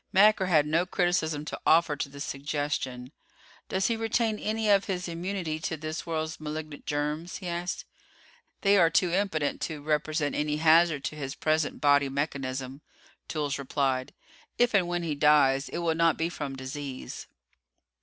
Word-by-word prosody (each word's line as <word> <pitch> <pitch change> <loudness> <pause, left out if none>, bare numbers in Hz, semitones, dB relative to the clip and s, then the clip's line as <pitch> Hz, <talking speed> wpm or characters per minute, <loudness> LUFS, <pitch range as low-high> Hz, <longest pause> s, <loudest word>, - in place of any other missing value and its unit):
Macker 200 -1 +5
had 155 -5 +4
no 165 +4 +1
criticism 165 -5 0
to - - -6
offer 160 -2 +4
to 140 - -3
this 140 +1 -6
suggestion. 140 -3 -3 0.6
"Does 190 0 0
he 230 - +2
retain 225 -1 0
any 220 0 -1
of 200 -1 +4
his 180 -2 -3
immunity 170 -2 -3
to 160 0 -3
this 155 +2 -5
world's 160 -1 -3
malignant 155 -1 -6
germs?" 150 +4 -2
he 185 - -7
asked. 175 +1 -3 0.8
"They 200 0 +5
are 165 -2 +6
too 175 +2 +2
impotent 175 -6 0
to 155 -2 -3
represent 150 0 0
any 150 0 0
hazard 160 -2 +4
to 125 - -3
his 140 -2 -5
present 155 -1 0
body 145 -1 +4
mechanism," 135 -1 -3 0.5
Toolls 145 -3 -2
replied. 135 -1 -1 0.5
"If 240 -1 +3
and 190 -4 +3
when 175 0 -2
he 160 -3 -1
dies, 145 -2 +4
it - - -5
will 165 - +3
not 165 0 +3
be 165 +1 0
from 145 -5 -5
disease." 130 0 -6
155 Hz, 165 wpm, -28 LUFS, 145-175 Hz, 0.8 s, are